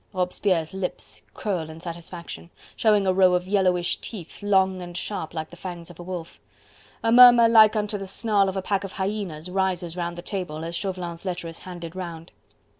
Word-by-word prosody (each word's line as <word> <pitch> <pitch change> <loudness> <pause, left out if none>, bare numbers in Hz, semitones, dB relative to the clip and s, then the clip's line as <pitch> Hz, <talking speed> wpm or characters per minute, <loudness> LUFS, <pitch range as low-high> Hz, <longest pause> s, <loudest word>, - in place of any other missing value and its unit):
Robespierre's 180 -2 0
lips 190 -1 -4
curl 180 -7 -2
in 160 +1 -9
satisfaction, 170 0 -8 0.3
showing 210 -3 +3
a 185 - +3
row 185 -1 +5
of 180 0 0
yellowish 185 -3 +2
teeth, 195 -5 -8
long 190 -2 +2
and 175 -1 -7
sharp 180 -4 -4
like 160 -1 -5
the - - -10
fangs 175 -1 -7
of 175 - -17
a - - -6
wolf. 175 -2 -7 0.6
A 225 - +2
murmur 240 -1 +9
like 220 -1 +7
unto 210 -1 -1
the 195 - -6
snarl 200 0 +2
of 190 - -4
a 190 - -2
pack 200 0 0
of 195 - -6
hyenas 190 -4 -3
rises 180 -3 -1
round 175 -1 -3
the 175 - -7
table, 175 -6 -4
as 170 +1 -4
Chauvelin's 180 -3 -4
letter 180 -3 -4
is 165 0 -9
handed 175 -2 -8
round. 170 -2 -7
185 Hz, 190 wpm, -25 LUFS, 170-195 Hz, 0.6 s, murmur